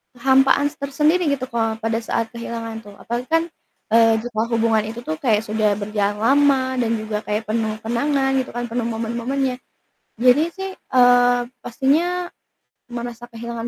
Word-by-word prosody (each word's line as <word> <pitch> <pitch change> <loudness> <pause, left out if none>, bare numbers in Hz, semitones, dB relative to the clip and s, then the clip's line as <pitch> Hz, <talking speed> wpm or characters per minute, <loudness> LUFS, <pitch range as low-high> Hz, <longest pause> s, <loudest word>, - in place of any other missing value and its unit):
kehampaan 270 +3 +3
tersendiri 300 +5 +1
gitu 280 -3 0
kalau 225 -1 0
pada 225 +1 -2
saat 225 0 -2
kehilangan 230 -1 -6
tuh, 205 -2 -14
apalagi 240 +4 -5
kan, 325 0 +2 0.5
eee, 225 0 +5
juga 235 -3 -2
hubungan 225 -1 +2
itu 235 +2 -7
tuh 155 -6 -4
kayak 220 -4 +2
sudah 215 -1 +1
berjalan 205 0 -1
lama 265 -1 +3
dan 230 -1 +1
juga 215 -1 -3
kayak 210 +1 -1
penuh 220 -1 -1
kenangan 270 +4 0
gitu 260 - -3
kan, 240 - -2
penuh 235 0 -1
momen-momennya. 240 +3 -2 0.6
Jadi 255 +4 +5
sih, 385 0 -5
eee, 245 -1 +4 0.2
pastinya 320 +8 0 0.6
merasa 240 0 -6
kehilangan 235 0 -6
235 Hz, 150 wpm, -21 LUFS, 225-270 Hz, 0.6 s, eee